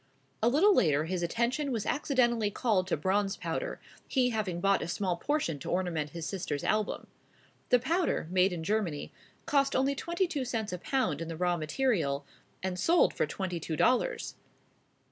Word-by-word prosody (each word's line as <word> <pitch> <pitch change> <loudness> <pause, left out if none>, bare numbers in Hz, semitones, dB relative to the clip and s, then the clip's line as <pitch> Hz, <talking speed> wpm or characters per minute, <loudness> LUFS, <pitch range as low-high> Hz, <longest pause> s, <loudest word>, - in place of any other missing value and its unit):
A 230 - +4
little 350 +11 +5
later 155 - +3
his 180 +1 -2
attention 240 - 0
was 225 -4 -2
accidentally 240 -7 +1
called 205 -4 +1
to 185 - 0
bronze 195 +5 0
powder, - - -3 0.3
he 250 -2 +2
having 205 -6 -2
bought 195 +2 +2
a - - -3
small 180 +1 -1
portion 170 - -1
to - - -6
ornament 175 -5 -1
his 165 +2 -6
sister's 165 -7 -3
album. 215 -1 0 0.6
The 250 - +6
powder, 325 - 0
made 185 +1 +4
in 170 -2 -4
Germany, 190 -6 -1 0.3
cost 275 -3 +2
only 270 +2 +2
twenty 340 +6 -1
two 300 -6 -2
cents 220 -5 -3
a 180 - -4
pound 250 - 0
in 165 - -4
the 165 -1 -5
raw 175 0 +1
material, 155 - 0 0.4
and 185 -1 -2
sold 335 - +4
for - - 0
twenty 185 -3 -3
two 160 0 -4
dollars. 255 - +1
200 Hz, 175 wpm, -30 LUFS, 170-260 Hz, 0.6 s, The